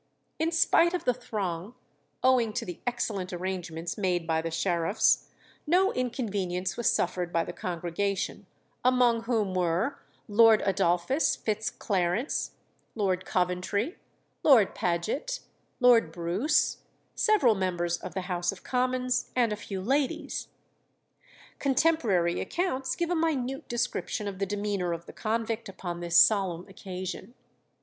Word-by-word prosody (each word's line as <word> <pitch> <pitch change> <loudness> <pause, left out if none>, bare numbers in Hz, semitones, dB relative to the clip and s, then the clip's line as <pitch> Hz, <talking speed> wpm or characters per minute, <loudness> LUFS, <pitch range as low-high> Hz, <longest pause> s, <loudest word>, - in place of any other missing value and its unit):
In 320 +1 +1
spite 340 +1 +4
of 350 - -3
the 250 - +3
throng, 205 -4 -4 0.5
owing 250 -4 +3
to - - -2
the 175 -2 -7
excellent 205 -6 -2
arrangements 175 -1 -4
made 180 -3 0
by 160 -1 +1
the 165 - -3
sheriffs, 170 +3 +1 0.4
no 370 +5 +3
inconvenience 200 -8 -2
was 235 - +2
suffered 180 0 -1
by 165 -1 +1
the 175 - -6
congregation, 185 +3 -3 0.4
among 245 -2 +3
whom 220 -5 0
were 180 +9 0 0.3
Lord 220 0 +6
Adolphus 195 - +2
Fitz 215 -2 -2
Clarence, 195 - -1 0.4
Lord 190 -4 0
Coventry, 185 - -1 0.4
Lord 245 -10 +5
Paget, 195 - -2 0.4
Lord 240 -9 +5
Bruce, 180 - +1 0.4
several 415 - +4
members 175 -3 -1
of 180 - -8
the 190 - -1
House 180 -1 -1
of 195 - -12
Commons, 255 0 0
and 235 -4 +2
a - - -1
few 200 -2 -6
ladies. 280 - -1 1.1
Contemporary 255 - +2
accounts 270 -8 -1
give 345 0 -1
a - - +2
minute 275 -5 -1
description 235 -2 -2
of 195 -2 -5
the 195 - 0
demeanour 200 -3 -1
of 170 0 -6
the - - -11
convict 225 0 -2
upon 175 -2 -6
this 170 0 +1
solemn 185 -5 +4
occasion. 190 +4 -7
205 Hz, 130 wpm, -28 LUFS, 180-250 Hz, 1.1 s, Lord